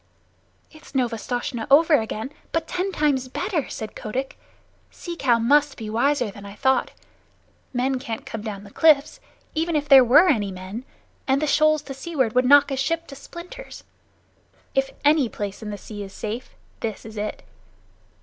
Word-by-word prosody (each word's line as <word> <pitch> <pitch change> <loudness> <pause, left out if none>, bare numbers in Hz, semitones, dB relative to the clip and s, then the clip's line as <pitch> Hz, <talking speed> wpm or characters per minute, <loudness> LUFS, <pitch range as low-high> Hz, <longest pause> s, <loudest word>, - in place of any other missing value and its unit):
"It's 310 -2 -16
Novastoshnah 240 -1 -2
over 315 +4 +6
again, 220 +4 -5 0.2
but 325 0 -1
ten 370 +2 -2
times 285 -6 +1
better," 340 +3 -2
said 215 -1 -6
Kotick. 260 +5 -4 0.5
"Sea 345 -1 -7
Cow 255 -7 +3
must 285 +5 +3
be 215 -2 -6
wiser 245 0 +1
than 200 +1 -12
I 200 0 -9
thought. 265 +4 +2 0.8
Men 260 +1 0
can't 230 -4 -6
come 225 - -6
down 205 -2 -6
the 200 - -13
cliffs, 300 0 +4 0.3
even 330 +1 -1
if 295 -1 0
there 270 -2 +9
were 285 +9 +6
any 210 - +2
men; 190 +6 -7 0.4
and 265 +1 +3
the 305 - 0
shoals 310 0 +3
to 275 - -7
seaward 270 -4 -1
would 250 0 +3
knock 285 +2 +6
a 270 - -1
ship 330 +5 -1
to 275 - -8
splinters. 350 - -10 0.9
If 270 0 +1 0.2
any 295 -4 +4
place 205 -1 -5
in 215 - -6
the 205 - -5
sea 205 0 -9
is 195 -1 -8
safe, 225 +4 -6 0.2
this 220 -3 -4
is 220 0 -10
it." 210 0 -4
265 Hz, 170 wpm, -23 LUFS, 220-300 Hz, 0.9 s, there